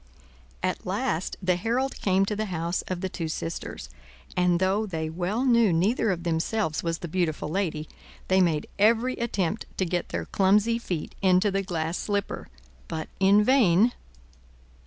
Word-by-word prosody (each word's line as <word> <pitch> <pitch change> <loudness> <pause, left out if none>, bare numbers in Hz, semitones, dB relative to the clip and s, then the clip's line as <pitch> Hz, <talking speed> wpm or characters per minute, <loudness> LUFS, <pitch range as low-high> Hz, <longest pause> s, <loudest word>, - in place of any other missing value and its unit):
At 185 0 -1
last 190 -2 -2
the 180 -1 +3
herald 245 +8 -1
came 195 0 +3
to 210 - -2
the 215 +1 -1
house 170 -1 -2
of 185 -1 -3
the 190 - -1
two 165 -3 -4
sisters, 165 +1 -5 0.5
and 180 -1 +3
though 195 +4 +1
they 160 -4 -3
well 185 +9 -1
knew 235 -5 +4
neither 205 +7 +2
of 175 -3 -1
themselves 165 +1 0
was 165 -1 -1
the 175 - -6
beautiful 160 -3 -1
lady, 160 -4 -2 0.4
they 190 0 +4
made 160 -4 +1
every 230 +4 +4
attempt 210 -4 -1
to 190 - +1
get 175 0 -2
their - - -3
clumsy 210 +4 +3
feet 175 -9 -4
into 190 +1 +4
the 195 0 0
glass 170 -3 -2
slipper, 205 -1 -2 0.4
but 155 -1 -5
in 200 +2 +5
vain. 225 -3 +4
185 Hz, 160 wpm, -26 LUFS, 170-210 Hz, 0.5 s, in